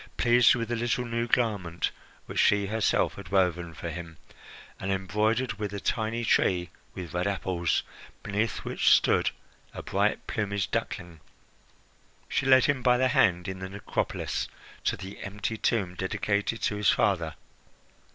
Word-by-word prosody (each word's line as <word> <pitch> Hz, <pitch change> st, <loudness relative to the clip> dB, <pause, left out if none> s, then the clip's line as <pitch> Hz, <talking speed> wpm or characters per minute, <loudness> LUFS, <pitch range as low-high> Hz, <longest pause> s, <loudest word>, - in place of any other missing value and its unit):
Pleased 120 Hz, 0 st, +5 dB
with 115 Hz, -2 st, -3 dB
the 120 Hz, -, 0 dB
little 120 Hz, +1 st, 0 dB
new 115 Hz, 0 st, -2 dB
garment 100 Hz, -9 st, 0 dB, 0.3 s
which -, -, -4 dB
she 105 Hz, -1 st, +4 dB
herself 110 Hz, +1 st, +1 dB
had 95 Hz, -4 st, -9 dB
woven 90 Hz, -3 st, +1 dB
for 85 Hz, -, -5 dB
him 80 Hz, -1 st, -8 dB, 0.6 s
and 95 Hz, -, -2 dB
embroidered 105 Hz, +4 st, 0 dB
with 105 Hz, -2 st, -3 dB
a -, -, -3 dB
tiny 115 Hz, +3 st, -1 dB
tree 90 Hz, -4 st, +2 dB, 0.2 s
with 90 Hz, -4 st, -7 dB
red 90 Hz, +2 st, 0 dB
apples, 95 Hz, -4 st, 0 dB, 0.4 s
beneath 105 Hz, +3 st, -2 dB
which -, -, +2 dB
stood -, -, +4 dB, 0.5 s
a -, -, -6 dB
bright -, -, 0 dB
plumaged 100 Hz, -4 st, -2 dB
duckling, 85 Hz, -2 st, -3 dB, 1.1 s
she 135 Hz, -, -1 dB
led 130 Hz, -1 st, +7 dB
him 140 Hz, -3 st, +1 dB
by 125 Hz, 0 st, +4 dB
the 130 Hz, +1 st, +3 dB
hand 90 Hz, -6 st, +3 dB
in 95 Hz, 0 st, -5 dB
the 95 Hz, 0 st, -5 dB
necropolis 100 Hz, +1 st, -2 dB, 0.4 s
to -, -, 0 dB
the 95 Hz, +1 st, -9 dB
empty 105 Hz, +3 st, -3 dB
tomb 100 Hz, -5 st, 0 dB
dedicated 100 Hz, +4 st, -1 dB
to 105 Hz, -, 0 dB
his 105 Hz, -2 st, +3 dB
father. 85 Hz, -7 st, +1 dB
100 Hz, 150 wpm, -28 LUFS, 90-115 Hz, 1.1 s, led